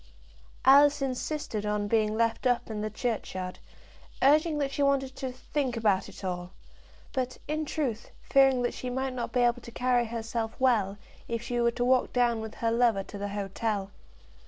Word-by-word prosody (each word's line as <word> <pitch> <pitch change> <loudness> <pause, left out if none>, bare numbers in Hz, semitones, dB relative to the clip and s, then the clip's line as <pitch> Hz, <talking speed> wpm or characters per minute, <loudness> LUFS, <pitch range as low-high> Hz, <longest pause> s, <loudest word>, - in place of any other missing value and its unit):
Alice 285 +2 +7
insisted 265 -4 -3
on 210 0 -1
being 215 0 +1
left 230 +2 +1
up 240 -2 0
in 210 -1 -3
the 215 - -2
churchyard, 210 -5 -3 0.6
urging 305 +3 +4
that 280 -2 -1
she 285 - -2
wanted 270 -1 +1
to 260 -1 -4
"think 255 -1 -3
about 205 -4 +1
it - - -12
all," 180 -1 -4 0.6
but, 255 -2 -2
in 310 +1 -1
truth, 260 -8 -3
fearing 270 -2 +4
that 240 - 0
she 255 - -5
might 260 +1 -2
not 245 -2 -4
be 250 - +1
able 240 0 +2
to 235 - -10
carry 245 0 +1
herself 225 0 -3
well, 220 -7 +2 0.3
if 230 0 -3
she 240 0 -1
were 235 - +4
to 245 +1 -1
walk 255 0 +3
down 240 -2 +2
with 220 0 -7
her 230 -1 0
lover 230 -4 +3
to 205 - -9
the 205 - -2
hotel. 200 0 -3
240 Hz, 180 wpm, -28 LUFS, 215-260 Hz, 0.6 s, Alice